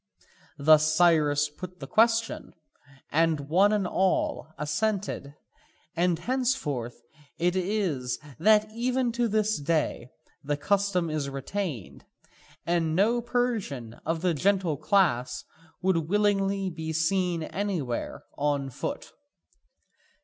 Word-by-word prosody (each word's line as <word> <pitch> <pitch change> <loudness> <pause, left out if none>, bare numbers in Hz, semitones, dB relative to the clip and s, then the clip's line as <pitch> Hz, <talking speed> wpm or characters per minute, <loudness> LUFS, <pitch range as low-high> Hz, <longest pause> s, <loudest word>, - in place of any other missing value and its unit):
Thus 155 +1 +5
Cyrus 150 -4 +4
put 180 +4 -10
the - - -6
question, 225 0 +1 0.6
and 165 0 +2
one 180 +9 +3
and 210 -3 +1
all 185 -3 0
assented; 150 -1 -2 0.6
and 175 0 +2
hence 255 +7 0 0.8
it 175 +2 +1
is 180 - -1 0.2
that 215 +4 +4
even 245 +1 0
to 240 0 0
this 215 -2 +1
day 150 -5 -1 0.3
the 145 +1 -1
custom 190 0 0
is 150 -3 -2
retained, 140 - -5 0.6
and 165 -2 +1
no 225 +6 +3
Persian 225 - -2
of 165 0 -2
the 180 -1 +2
gentle 185 0 +1
class 150 -5 +1 0.4
would 165 -4 +1
willingly 195 -1 +1
be 160 -1 -5
seen 170 +1 0
anywhere 170 -10 -3
on 140 -2 -1
foot. - - -5
175 Hz, 110 wpm, -27 LUFS, 150-205 Hz, 0.8 s, Thus